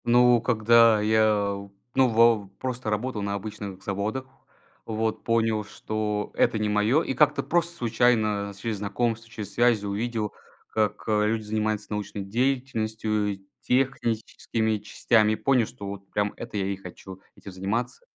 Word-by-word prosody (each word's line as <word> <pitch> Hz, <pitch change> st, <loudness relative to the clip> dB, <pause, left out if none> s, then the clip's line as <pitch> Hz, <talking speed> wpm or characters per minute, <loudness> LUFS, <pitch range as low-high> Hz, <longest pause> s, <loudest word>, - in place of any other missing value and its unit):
Ну, 120 Hz, 0 st, +5 dB
когда 115 Hz, -1 st, +5 dB
я 105 Hz, -2 st, +2 dB, 0.3 s
ну, 130 Hz, -1 st, +4 dB
вав 115 Hz, -3 st, +4 dB
просто 125 Hz, -3 st, -3 dB
работал 105 Hz, +1 st, -2 dB
на 100 Hz, 0 st, -2 dB
обычных 100 Hz, -2 st, -7 dB
заводах, 105 Hz, +7 st, -2 dB, 0.6 s
вот. 110 Hz, 0 st, -2 dB
Понял, 115 Hz, -2 st, +1 dB
что 105 Hz, 0 st, -3 dB
это -, -, +2 dB
не 105 Hz, -1 st, 0 dB
мое. 105 Hz, +9 st, +3 dB
И 130 Hz, -, -2 dB
как-то 140 Hz, 0 st, +3 dB
просто 170 Hz, 0 st, +1 dB
случайно 110 Hz, -3 st, +1 dB
через 110 Hz, 0 st, -3 dB
знакомств, 115 Hz, +3 st, -2 dB
через 105 Hz, -4 st, -7 dB
связи, 120 Hz, -2 st, +3 dB
увидел, 105 Hz, +1 st, -2 dB, 0.4 s
как 105 Hz, -1 st, 0 dB
люди 110 Hz, +1 st, +1 dB
занимаются 110 Hz, 0 st, -2 dB
научной 105 Hz, -1 st, -4 dB
деятельностью, 110 Hz, -3 st, -1 dB, 0.2 s
техническими 115 Hz, -3 st, 0 dB
частями. 110 Hz, +1 st, +2 dB
И -, -, 0 dB
понял, 120 Hz, +1 st, +2 dB
что 110 Hz, -5 st, -10 dB
вот 100 Hz, 0 st, -7 dB
прям 105 Hz, 0 st, -1 dB
это 115 Hz, -2 st, -6 dB
я 100 Hz, -, 0 dB
и 100 Hz, 0 st, -1 dB
хочу, 95 Hz, 0 st, -11 dB
этим 100 Hz, -, -11 dB
заниматься. 100 Hz, -, -3 dB
110 Hz, 140 wpm, -26 LUFS, 105-120 Hz, 0.6 s, Ну